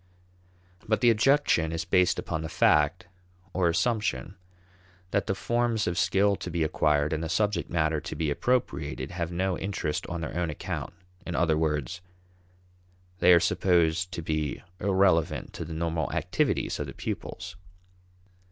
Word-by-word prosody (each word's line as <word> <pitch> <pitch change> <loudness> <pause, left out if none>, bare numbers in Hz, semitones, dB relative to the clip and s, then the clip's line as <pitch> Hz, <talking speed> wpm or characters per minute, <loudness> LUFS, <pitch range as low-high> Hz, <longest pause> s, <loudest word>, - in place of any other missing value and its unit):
But 110 0 +1
the 120 -2 +6
objection 110 - +3
is 80 0 -3
based 90 0 +3
upon 80 - -3
the 80 - -5
fact 75 +3 +3 0.5
or 90 -2 +2
assumption 95 - 0 0.8
that 100 - 0
the 95 - 0
forms 120 0 0
of 85 - -1
skill 100 +3 +3
to - - -6
be 85 -1 0
acquired 75 -1 +1
and 80 +1 -2
the 80 - -3
subject 100 0 0
matter 80 -2 0
to - - -6
be 80 -3 -1
appropriated 110 - -1
have 85 -1 -3
no 90 +1 -1
interest 95 -6 -3
on 85 -1 -4
their 80 - -5
own 85 -1 -1
account: 75 - -5 0.3
in 90 - -5
other 80 -2 +2
words, 80 +2 -1 1.2
they - - +6
are 85 - +8
supposed 85 0 +2
to 85 - -4
be 75 -2 -2 0.2
irrelevant 95 -4 +2
to - - -5
the 80 - -7
normal 80 0 -1
activities - - 0
of - - -3
the - - -9
pupils. 90 0 -5
85 Hz, 155 wpm, -27 LUFS, 80-95 Hz, 1.2 s, are